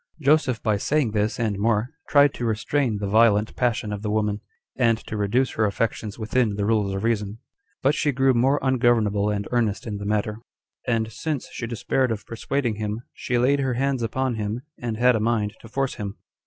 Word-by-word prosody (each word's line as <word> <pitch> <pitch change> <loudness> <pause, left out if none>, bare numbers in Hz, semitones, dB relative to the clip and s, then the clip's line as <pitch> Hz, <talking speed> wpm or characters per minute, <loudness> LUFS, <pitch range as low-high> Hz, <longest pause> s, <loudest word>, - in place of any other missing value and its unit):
5. 155 - -14
Joseph, 140 -5 +3
by 105 -1 +2
saying 140 +2 +1
this, 105 +2 0
and 105 -4 -1
more, 115 +2 +1 0.2
tried 145 -1 +5
to - - -6
restrain 115 +1 0
the 100 - -3
violent 110 0 +3
passion 115 -4 0
of 100 - -5
the 105 - -3
woman, 105 -1 0 0.3
and 115 -3 +3
to - - -5
reduce 110 +5 +1
her 110 - +1
affections 105 0 -2
within 110 -1 0
the 100 0 -1
rules 105 -3 +1
of 95 - -3
reason; 105 -2 -1 0.5
but 135 +2 +4
she 150 -1 +1
grew 135 0 +3
more 130 +4 +3
ungovernable 115 -6 +2
and 100 -1 -2
earnest 115 -4 0
in 105 -3 -4
the 100 - -6
matter; 105 +1 -1 0.5
and 115 -2 0
since 150 +4 -4
she 115 - -5
despaired 125 +2 0
of 110 -2 -4
persuading 115 0 -2
him, 105 +1 -3
she 125 - -2
laid 135 +4 +3
her 130 -3 0
hands 135 0 0
upon 130 +3 -1
him, 110 +1 -3 0.2
and 115 -2 -3
had 125 +1 +4
a - - +1
mind 110 -2 0
to - - -12
force 135 +3 -1
him. 100 -1 -6
115 Hz, 205 wpm, -24 LUFS, 105-125 Hz, 0.5 s, tried